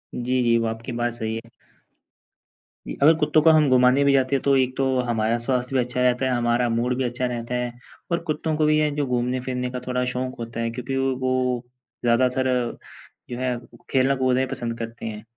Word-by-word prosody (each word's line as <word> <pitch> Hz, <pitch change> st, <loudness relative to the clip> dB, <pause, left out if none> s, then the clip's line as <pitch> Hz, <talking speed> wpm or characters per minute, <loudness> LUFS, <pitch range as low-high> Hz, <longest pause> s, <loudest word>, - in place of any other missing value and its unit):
जी, 125 Hz, +1 st, 0 dB
जी, 115 Hz, -1 st, +3 dB
वो 115 Hz, -, 0 dB
आपकी 115 Hz, +3 st, -5 dB
बात 120 Hz, 0 st, -1 dB
सही 110 Hz, -1 st, -4 dB
है। 115 Hz, +1 st, -8 dB, 1.4 s
इ -, -, -4 dB
अगर 155 Hz, +3 st, +8 dB
कुत्तों 150 Hz, 0 st, +3 dB
को 160 Hz, -, +5 dB
हम 155 Hz, -3 st, +4 dB
घुमाने 130 Hz, +2 st, +5 dB
भी 140 Hz, 0 st, +4 dB
जाते 135 Hz, 0 st, +2 dB
हैं 135 Hz, -, 0 dB
तो 140 Hz, -1 st, +3 dB
एक 130 Hz, -1 st, +1 dB
तो 135 Hz, -, +1 dB, 0.2 s
हमारा 115 Hz, 0 st, +1 dB
स्वास्थ्य 125 Hz, +1 st, -2 dB
भी -, -, +4 dB
अच्छा 125 Hz, +1 st, -3 dB
रहता 125 Hz, +1 st, +2 dB
है, 130 Hz, -, +1 dB
हमारा 120 Hz, 0 st, +1 dB
मूड 120 Hz, +2 st, 0 dB
भी 130 Hz, -, 0 dB
अच्छा 125 Hz, +1 st, -2 dB
रहता 120 Hz, 0 st, -3 dB
है 125 Hz, 0 st, -2 dB, 0.4 s
और 170 Hz, -, +2 dB
कुत्तों 155 Hz, +1 st, -1 dB
को 155 Hz, -, +2 dB
भी 155 Hz, 0 st, +4 dB
यह 150 Hz, 0 st, +2 dB
जो 145 Hz, -1 st, 0 dB
घूमने-फिरने 125 Hz, +1 st, -1 dB
का 125 Hz, -, -4 dB
थोड़ा 125 Hz, 0 st, 0 dB
शौक 130 Hz, 0 st, -3 dB
होता 115 Hz, 0 st, -6 dB
है 115 Hz, 0 st, 0 dB
क्योंकि 125 Hz, +3 st, -4 dB
वो 130 Hz, -2 st, 0 dB, 0.4 s
ज़्यादातर 125 Hz, +2 st, +2 dB, 0.8 s
जो 120 Hz, -, -5 dB
है 130 Hz, -1 st, -1 dB, 0.3 s
खेलना-कूदना 130 Hz, -1 st, +2 dB
ही -, -, +1 dB
पसंद 120 Hz, -2 st, -4 dB
करते 115 Hz, 0 st, -6 dB
हैं। 105 Hz, -1 st, -6 dB
125 Hz, 205 wpm, -23 LUFS, 120-130 Hz, 1.4 s, अगर